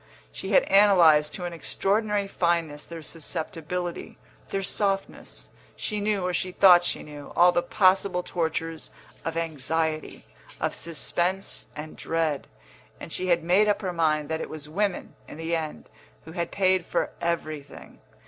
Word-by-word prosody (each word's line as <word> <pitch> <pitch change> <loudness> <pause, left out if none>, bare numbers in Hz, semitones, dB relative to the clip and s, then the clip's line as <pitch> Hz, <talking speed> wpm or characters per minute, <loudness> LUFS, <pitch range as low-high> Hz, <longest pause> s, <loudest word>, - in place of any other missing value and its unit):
She - - -7
had - - +6
analysed 170 - +5
to 180 - -5
an 175 - -4
extraordinary 205 +4 0
fineness 170 -5 -1
their 165 -1 -8
susceptibility, 170 +2 -4 0.3
their 195 0 -2
softness; 195 0 -2 0.3
she 210 -2 -3
knew 205 -3 0
(or 180 - -1
she 185 +1 -1
thought 180 -2 +7
she - - -1
knew) 145 -1 -10
all 180 +1 +7
the 175 - +2
possible 185 0 +2
tortures 165 -2 -3 0.3
of 165 0 -3
anxiety, 160 0 -2 0.3
of - - -1
suspense 175 +4 -2
and 155 +1 -7
dread; 160 -3 -1 0.5
and - - -8
she 185 - 0
had 170 -2 +2
made 185 +5 +4
up 205 - 0
her 185 -2 -2
mind 155 -3 +1
that 160 0 -2
it - - -5
was 155 -2 -7
women, 195 +4 -2
in - - -10
the 165 +1 -1
end, 160 -2 -5 0.4
who 160 - -9
had 170 0 -3
paid 185 -2 +2
for - - -1
everything. 155 -4 -4
170 Hz, 155 wpm, -26 LUFS, 160-190 Hz, 0.5 s, thought